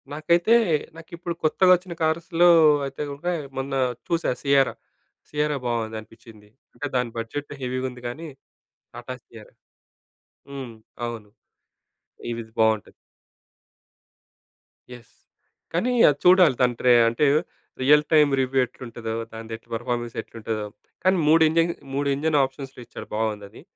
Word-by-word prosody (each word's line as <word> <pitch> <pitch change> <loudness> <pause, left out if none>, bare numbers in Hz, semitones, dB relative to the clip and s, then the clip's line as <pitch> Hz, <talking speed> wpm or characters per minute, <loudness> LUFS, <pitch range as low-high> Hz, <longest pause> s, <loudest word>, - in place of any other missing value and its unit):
నాకైతే 170 +7 +2 0.4
నాకిప్పుడు 170 +1 -7
కొత్తగా 180 +4 +4
వచ్చిన 180 0 -7
కార్స్‌లో 165 +2 +3 0.4
అయితే 135 +1 -6
గనక, 140 +5 -7 0.3
మొన్న 135 +1 -3 0.3
చూసా 170 -2 0
సియరా. 140 -2 +3 0.6
సియరా 150 0 -1
బాగుందనిపించింది. 110 -2 -6 0.2
అంటే, - - -6
దాని 125 -2 0
బడ్జెట్ 115 +6 -5
హెవీగా 130 0 -2
ఉంది 125 0 -13
కానీ, 155 +8 -6 0.7
టాటా 120 +2 -7
సియరా. 115 -2 -15 1.0
హ్మ్. 135 -4 -7 0.3
అవును 115 -3 -8 1.0
ఇవిది 115 -1 -6
బాగుంటది. 110 -1 +2 2.0
యెస్. 120 -1 -14 0.6
కానీ, 205 +10 +1 0.2
అది 145 -1 -1
చూడాలి 180 -6 +6
దాని 125 -1 +3
ట్రే 125 -1 +5 0.2
అంటే 115 +6 +1 0.6
రియల్ 150 +3 +5
టైమ్ 150 -2 +5
రివ్యూ 130 +1 0
ఎట్లుంటదో, 115 -2 -7 0.2
దానిదెట్ల 115 0 -8
పెర్ఫార్మెన్స్ 120 0 -3
ఎట్లుంటదో. 110 -2 -5 0.4
కానీ, 185 +1 +3
3 160 +1 +6
ఇంజిన్ 165 +1 +2 0.2
3 140 +1 -1
ఇంజిన్ 150 +2 +1
ఆప్షన్స్‌లో 135 -1 -6
ఇచ్చాడు - - -10
బాగుందది. 105 -2 -4
135 Hz, 115 wpm, -24 LUFS, 115-155 Hz, 2.0 s, చూడాలి